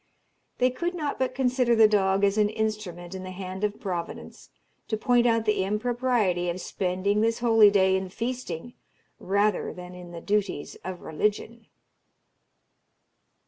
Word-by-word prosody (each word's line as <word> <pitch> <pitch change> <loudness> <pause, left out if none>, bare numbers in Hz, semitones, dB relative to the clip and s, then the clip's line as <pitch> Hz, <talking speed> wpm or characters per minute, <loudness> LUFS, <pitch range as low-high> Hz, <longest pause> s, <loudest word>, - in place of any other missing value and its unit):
They 255 0 +3
could 345 +7 -3
not 300 -4 -3
but 260 -1 -1
consider 250 -2 +2
the 220 -1 +7
dog 195 -2 +2
as 200 0 +3
an 210 -1 +3
instrument 210 -5 -4
in 190 - -6
the 185 - -7
hand 185 +1 -6
of 210 0 -1
Providence 175 -4 -6 0.4
to 220 - -1
point 245 +1 +3
out 230 -1 +2
the 210 -3 +2
impropriety 210 -4 0
of 175 +1 -3
spending 190 +3 -1
this 225 +1 +2
holy 225 -3 +6
day 190 -2 +3
in 190 0 -2
feasting 240 -2 -5 0.5
rather 200 +1 +1
than 180 0 -10
in 180 -1 -10
the 170 -1 -8
duties 200 -5 -1
of 185 -1 -6
religion. 210 +7 -2
210 Hz, 150 wpm, -26 LUFS, 185-235 Hz, 0.5 s, the